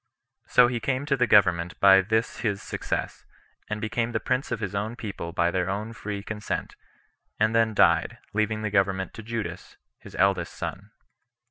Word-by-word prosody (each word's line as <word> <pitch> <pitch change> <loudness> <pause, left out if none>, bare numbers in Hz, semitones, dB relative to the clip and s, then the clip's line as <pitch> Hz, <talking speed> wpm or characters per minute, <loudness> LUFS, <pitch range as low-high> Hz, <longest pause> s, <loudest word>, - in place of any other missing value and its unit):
So 125 - +6
he 120 -1 -2
came 135 +3 -1
to 140 -2 +2
the 125 -2 +2
government 90 -5 +3
by 95 -1 +7
this 110 +4 -1
his 100 -4 -2
success, - - -4 0.5
and 105 0 -2
became 115 +2 -2
the 110 - +1
prince 130 +3 -1
of 120 - -1
his 105 -4 -4
own 105 +3 -2
people 100 -7 -6
by 85 +1 +1
their 90 0 -1
own 105 +3 -3
free 105 -2 -5
consent, 105 0 -4 0.6
and 110 +1 +3
then 115 -1 +2
died, 85 -4 +3 0.2
leaving 110 0 0
the 105 - -2
government 95 -1 +1
to - - -8
Judas, 115 0 -6 0.2
his - - -13
eldest 95 -3 +1
son. - - -6
105 Hz, 175 wpm, -26 LUFS, 95-115 Hz, 0.6 s, by